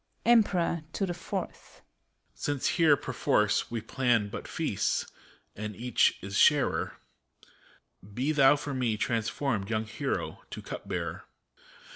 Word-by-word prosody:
EicpEROR 185 -8 +3
(to 195 - 0
the 175 - -3
Fourth). 175 - -6 0.5
Since 145 -2 -1
here, 155 -4 +4
perforce, - - +1
we 115 -1 -3
plan 120 -6 +1
but - - -7
feasts, - - -1 0.5
and 105 0 -5
each 120 0 +2
is 100 +1 -5
sharer, 135 - +3 1.1
Be 130 +8 -1
thou 140 -2 +6
for 145 -1 -5
me 120 -5 0
transformed, 115 -1 -1
young 110 -1 -1
hero, 140 +5 -3
to - - -7
Cup - - -7
Bearer! - - -4
130 Hz, 125 wpm, -29 LUFS, 110-150 Hz, 1.1 s, thou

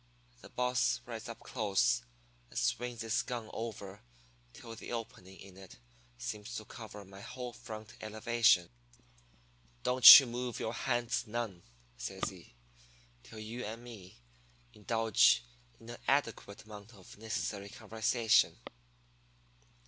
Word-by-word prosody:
"The - - -13
boss 125 -1 0
rides 115 -1 -7
up 115 0 -9
close, 115 +2 +1 0.5
and - - -10
swings 120 0 -1
his 115 +1 0
gun 120 -3 -6
over 105 -3 -6 0.5
till 115 -1 -10
the - - -9
opening 95 -5 -7
in 95 -1 -13
it 95 -7 -13 0.4
seems 105 - -6
to 110 - -6
cover 105 -3 -10
my 95 +1 -13
whole 125 +2 -7
front 110 -3 -9
elevation. 110 - +2 1.1
"'Don't 125 +2 +11
you 135 - -2
move 120 0 -4
your 110 - -3
hands 120 0 -1
none,' 105 -5 -4 0.4
says - - -4
he, - - -16 0.7
'till 110 - -13
you 115 +3 -6
and 115 +3 -7
me 105 -7 -12 0.6
indulge 110 - +3 0.4
in 115 - -11
a 120 - -9
adequate 115 -7 -1
amount 105 +1 -12
of 95 +1 -15
necessary 105 -2 -4
conversation.' 110 +1 +1
115 Hz, 125 wpm, -33 LUFS, 105-120 Hz, 1.1 s, Don't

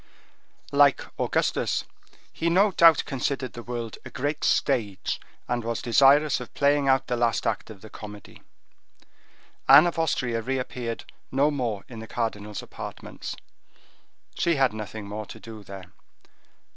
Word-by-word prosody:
Like 140 -1 +5 0.2
Augustus, - - 0 0.5
he 170 - 0
no 195 +4 +4
doubt 165 -3 +6
considered 135 -2 -2
the 120 - -7
world 120 -2 -5
a - - -8
great 145 +3 -3
stage, 110 -9 0 0.3
and 120 -1 -1
was 115 0 -2
desirous 140 +4 +5
of 125 - -9
playing 140 0 +3
out 135 -1 +3
the 125 - -1
last 120 -1 +1
act 115 0 -1
of 105 -4 -11
the 110 - -11
comedy. 105 -1 -11 1.3
Anne 145 +4 +10
of 170 -1 -1
Austria 125 -7 0
reappeared 125 -1 -3 0.3
no 140 +3 +3
more 120 -8 -2
in 115 -3 -9
the 110 - -8
cardinal's 105 -3 -3
apartments; - - -8 1.0
she 170 -1 +1
had 135 -5 +3
nothing 110 -1 -6
more 105 +1 -6
to 110 - -10
do 110 -1 -10
there. 95 -2 -11
120 Hz, 145 wpm, -26 LUFS, 110-140 Hz, 1.3 s, Anne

